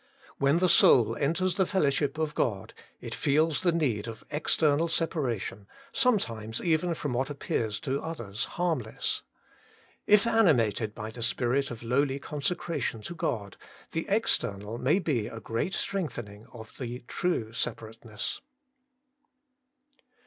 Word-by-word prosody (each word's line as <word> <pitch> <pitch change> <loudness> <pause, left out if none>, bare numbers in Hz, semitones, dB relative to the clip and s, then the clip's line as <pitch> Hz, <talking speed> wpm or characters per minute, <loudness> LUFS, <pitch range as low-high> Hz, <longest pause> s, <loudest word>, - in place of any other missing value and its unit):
When 140 +3 +4
the 185 +1 +3
soul 115 -8 +6
enters 170 +7 0
the 190 - +4
fellowship 145 -5 +1
of 155 -1 -1
God, 100 -9 -1 0.3
it - - -6
feels 155 +3 +2
the 180 -2 +3
need 125 -11 0
of 115 -1 -8
external 155 +1 +2
separation, 130 - -2 0.2
sometimes 115 - +1
even 170 0 +1
from 145 -4 -3
what 130 +3 0
appears 115 -6 -2
to 140 -3 -1
others 115 -11 -3
harmless. 160 -11 -1 0.9
If 210 0 +6
animated 125 - +3
by 110 0 -5
the 115 - -7
spirit 125 +4 +1
of 120 -1 -8
lowly 135 +3 +1
consecration 150 -4 -2
to 175 - -6
God, 105 - -3 0.3
the 165 - -2
external 115 - 0
may 145 +8 +3
be 140 - 0
a 115 - -7
great 115 - -2
strengthening 120 - -4
of 110 -2 -11
the 125 -1 -5
true 115 -11 -1
separateness. 115 -1 -4
140 Hz, 130 wpm, -29 LUFS, 115-165 Hz, 0.9 s, soul